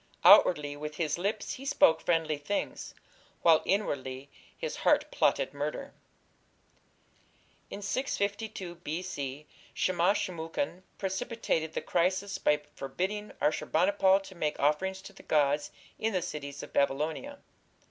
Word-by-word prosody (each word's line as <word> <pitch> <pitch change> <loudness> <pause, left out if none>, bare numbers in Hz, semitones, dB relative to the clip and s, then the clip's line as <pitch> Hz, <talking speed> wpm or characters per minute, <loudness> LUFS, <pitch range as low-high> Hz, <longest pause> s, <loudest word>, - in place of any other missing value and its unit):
"Outwardly 145 -4 +7
with 150 +1 -6
his 160 -1 -1
lips 200 +4 -2
he 265 - -8
spoke 160 -11 +4
friendly 160 -3 +1
things, 175 +8 -3 0.5
while 165 -2 +6
inwardly 140 -9 -2 0.3
his - - -4
heart - - +2
plotted - - +1
murder." 150 - -4 1.8
In 205 - -7
652 200 -5 -2
B.C. 150 -4 -4 0.3
Shamash 185 +3 +2
shum 185 -4 -4
ukin 175 - -3 0.2
precipitated 190 -5 -2
the - - -2
crisis 190 +3 0
by 150 0 +2
forbidding 190 +10 -3
Ashur 150 - 0
bani 180 +5 +3
pal 195 -1 +4
to 195 - -11
make 155 -4 -2
offerings 190 +7 +1
to 200 - -11
the - - -14
gods 145 -1 +2 0.3
in 225 0 0
the 185 -2 0
cities 145 -5 -6
of - - -10
Babylonia. 155 - 0
175 Hz, 130 wpm, -30 LUFS, 150-200 Hz, 1.8 s, Outwardly